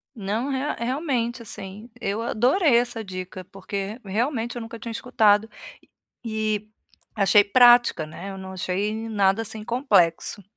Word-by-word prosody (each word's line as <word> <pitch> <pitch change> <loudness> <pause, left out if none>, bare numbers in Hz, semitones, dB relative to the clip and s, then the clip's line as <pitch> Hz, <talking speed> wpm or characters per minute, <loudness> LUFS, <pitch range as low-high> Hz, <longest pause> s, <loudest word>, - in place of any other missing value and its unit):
Não, 220 +5 -2
rea 275 +2 -1
realmente, 245 -2 -1
assim, 205 +1 -8
eu 200 +3 -2
adorei 250 - +3
essa 240 -2 -1
dica, 185 -1 -7
porque 195 +4 -6
realmente 230 +4 -2
eu 240 - -5
nunca 225 0 -8
tinha 230 - -6
escutado, 220 -2 +2 0.8
e 215 -2 -2 0.5
e 215 - -8
achei 200 +1 +6
prática, 240 -6 +5
né, 185 +5 -8
eu 195 - -8
não 190 0 -8
achei 190 +3 -2
nada 200 0 +2
assim 220 0 -7
complexo. 210 - +1
220 Hz, 140 wpm, -24 LUFS, 195-240 Hz, 0.8 s, achei